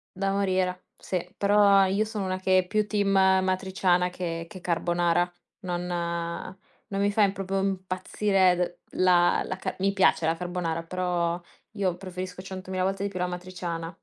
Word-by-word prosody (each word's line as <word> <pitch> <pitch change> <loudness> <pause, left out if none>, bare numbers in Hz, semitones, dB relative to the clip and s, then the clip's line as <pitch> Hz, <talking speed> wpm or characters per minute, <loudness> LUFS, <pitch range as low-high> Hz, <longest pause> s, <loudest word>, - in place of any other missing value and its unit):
Da 195 +1 0
morire, 185 -2 0
sì. 180 -2 -3
Però 200 -1 +5
io 195 +3 +1
sono 215 -3 -4
una 185 0 -2
che 185 0 +4
è 180 - -2
più 215 +1 0
team 205 -2 +1
amatriciana 190 -1 +2
che 165 -2 -4
che 185 -4 -10
carbonara. 175 0 +1 0.3
Non 180 -3 -3 1.0
non 195 0 -1
mi 205 0 +2
fa 215 - +1
im 195 -1 +2
proprio 195 0 -2
impazzire 190 0 +1 0.3
d - - -21
la 175 -1 +4
la 185 - -3
ca - - -4
mi 195 +1 +1
piace 190 -4 +3
la 165 +1 +2
carbonara, 175 -2 -3
però 175 -1 -1 0.3
io 195 -4 0
preferisco 185 -1 -6
centomila 185 -1 -4
volte 195 +1 -1
di 200 - -1
più 185 - -6
l'amatriciana. 180 -2 -4
185 Hz, 165 wpm, -27 LUFS, 180-195 Hz, 1.0 s, Però